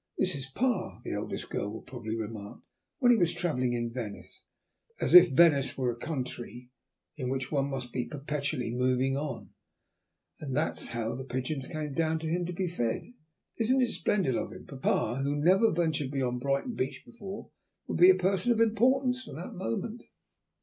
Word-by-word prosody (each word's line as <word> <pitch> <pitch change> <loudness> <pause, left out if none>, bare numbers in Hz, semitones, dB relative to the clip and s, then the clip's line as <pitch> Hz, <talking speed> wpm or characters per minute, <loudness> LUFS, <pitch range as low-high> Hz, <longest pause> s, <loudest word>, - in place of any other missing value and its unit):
'This 185 - +1
is 135 -2 -4
pa,' 225 - -1
the - - -4
eldest - - -4
girl 100 - -2
will 110 - -8
probably 115 -3 -5
remark, 105 -2 -6 0.4
'when 245 -2 +5
he 240 - +6
was 170 -1 +3
travelling 130 -8 0
in 120 -1 -2
Venice' 115 -5 -7 0.5
(as - - 0
if 180 0 +11
Venice 140 -2 +4
were 125 -2 +1
a - - -6
country 125 -2 -6 0.5
in 130 -4 -2
which 135 0 -2
one 140 -2 +1
must 125 -3 -5
be 125 - -1
perpetually 145 -4 -3
moving 130 +1 +1
on), 140 -3 -4 0.9
'and 135 -3 -3
that's 155 - -1
how 115 -1 -2
the 130 - -5
pigeons 130 +2 -3
came 155 -3 -4
down 160 +1 +1
to 160 - -6
him 175 +2 0
to 180 - -4
be 185 +1 -1
fed. 120 - -2 0.4
Isn't 255 +3 +3
it 240 - 0
splendid 185 - +1
of - - -2
him?' - - -10
Papa, 135 -1 0
who 140 +1 0
has 145 - -2
never 190 +7 +5
ventured 160 -5 0
beyond 130 -3 -1
Brighton 140 - 0
beach 130 - -3
before, 215 -5 -9 0.3
will - - -3
be 180 +2 +8
a 190 - +8
person 190 +4 +2
of 230 - +2
importance 250 +3 +3
from - - -9
that 175 - -7
moment." 200 - -3
145 Hz, 185 wpm, -29 LUFS, 125-185 Hz, 0.9 s, if